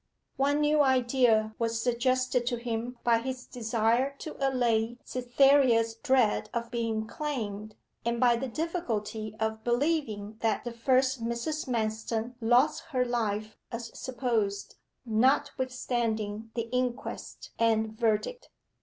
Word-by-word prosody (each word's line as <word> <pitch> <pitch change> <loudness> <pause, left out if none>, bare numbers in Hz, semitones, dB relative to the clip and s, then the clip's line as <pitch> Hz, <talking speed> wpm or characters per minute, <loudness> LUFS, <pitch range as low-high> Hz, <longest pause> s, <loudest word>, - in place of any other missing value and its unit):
One 285 +2 +2
new 300 0 +4
idea 245 -5 +3
was 230 -1 0
suggested 250 +1 +1
to 245 - +1
him 235 +1 -4
by 230 -1 +4
his 255 +1 -5
desire 235 +3 0
to 310 - -7
allay 240 -4 +1
Cytherea's 250 -2 +3
dread 235 -4 +2
of 235 0 -3
being 225 -2 -1
claimed, 215 -7 -4 0.3
and 235 0 -1
by 240 -1 +5
the 255 +3 -3
difficulty 225 - -3
of 220 0 -2
believing 240 -5 0
that 225 -2 0
the 240 - -4
first 255 +1 +2
Mrs. 235 +7 -2
Manston 225 0 -2
lost 275 +8 +3
her 260 -6 0
life 215 -3 -2 0.2
as 230 -1 -5
supposed, 230 -6 -2 0.3
notwithstanding 230 -3 0
the 230 -1 -2
inquest 250 -1 -3
and 220 -1 +2
verdict. 230 - -1
235 Hz, 120 wpm, -29 LUFS, 225-260 Hz, 0.3 s, by